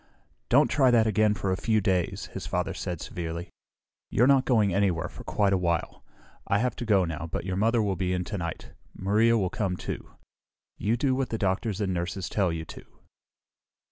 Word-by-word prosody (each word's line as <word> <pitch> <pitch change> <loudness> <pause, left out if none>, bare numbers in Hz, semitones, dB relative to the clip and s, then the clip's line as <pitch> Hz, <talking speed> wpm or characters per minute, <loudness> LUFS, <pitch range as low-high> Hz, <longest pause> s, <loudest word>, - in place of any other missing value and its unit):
"Don't 140 +3 +5
try 130 +1 +3
that 115 -2 +4
again 110 0 +3
for 95 -1 -2
a - - +2
few 110 +3 +1
days!" 95 -3 0
his - - -5
father - - -1
said 85 -3 -4
severely. 85 -6 -5 0.6
"You're 120 - +3
not 135 -1 +4
going 110 -7 +3
anywhere 95 -5 +1
for - - -11
quite 100 -1 +1
a 95 - +2
while. 85 -2 -2 0.4
I 100 - +2
have 125 +4 0
to 120 - -4
go 100 -5 +3
now, 80 0 -5
but - - -3
your 95 -1 -2
mother 115 +3 +2
will 100 -2 0
be 90 0 -1
in 90 -1 0
tonight. 85 -5 -5 0.2
Maria 110 +4 +3
will 95 -4 0
come, 95 -4 -1
too. - - -6 0.7
You 110 +3 +1
do 130 +1 +1
what 130 -1 -1
the 115 - -2
doctors 100 +1 -1
and 95 -3 0
nurses 90 +2 -3
tell 95 -4 +1
you 80 -1 -4
to!" - - -10
100 Hz, 200 wpm, -27 LUFS, 90-115 Hz, 0.7 s, Don't